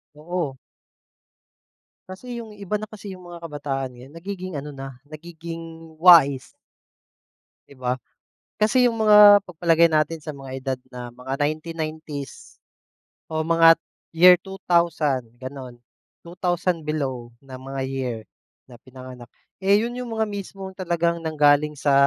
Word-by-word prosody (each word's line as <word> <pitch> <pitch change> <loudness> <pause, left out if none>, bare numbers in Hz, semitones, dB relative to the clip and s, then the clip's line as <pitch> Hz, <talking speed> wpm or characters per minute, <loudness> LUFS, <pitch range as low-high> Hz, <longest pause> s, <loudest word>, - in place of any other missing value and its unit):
Oo. 155 -3 -4 1.5
Kasi 235 +6 -7
'yong 220 -2 -10
iba 205 +1 -3
na 215 - -6
kasi 205 -2 -10
'yong 180 -1 -11
mga 170 -1 -10
kabataan 140 -4 -4
ngayon. 130 +5 -14
Nagiging 185 0 -6
ano 145 +1 -5
na, 135 -1 -8 0.2
nagiging 165 0 -9
wais. 160 -7 +6 1.2
'Di 140 - -16
ba? 125 0 -2 0.6
Kasi 245 +4 +3
'yong 235 - +1
mga 210 -1 +8
pagpalagay 170 -2 +2
natin 155 0 0
sa 155 - -6
mga 135 -2 -10
edad 130 -1 -3 0.2
na 125 -1 -7
mga 125 +2 -6
1990s 155 -2 -5 0.8
o 160 0 -2
mga 165 0 +6
t - - -67 0.3
year 180 +2 +8
2000, 170 -8 0 0.2
gano'n. 130 -2 -9 0.4
2000 175 -1 -2
below 135 -6 -3
na 135 -2 -11
mga 135 +1 -6
year 130 -3 -3 0.5
na 125 - -14
pinanganak. 130 -1 -12 0.3
Eh, 200 +2 +5
'yon 240 +2 -3
'yong 250 -2 -6
mga 220 - +1
mismong 195 -1 -7
talagang 170 -2 -1
nanggaling 150 -1 +2
sa 140 -2 +2
160 Hz, 135 wpm, -23 LUFS, 135-180 Hz, 1.5 s, mga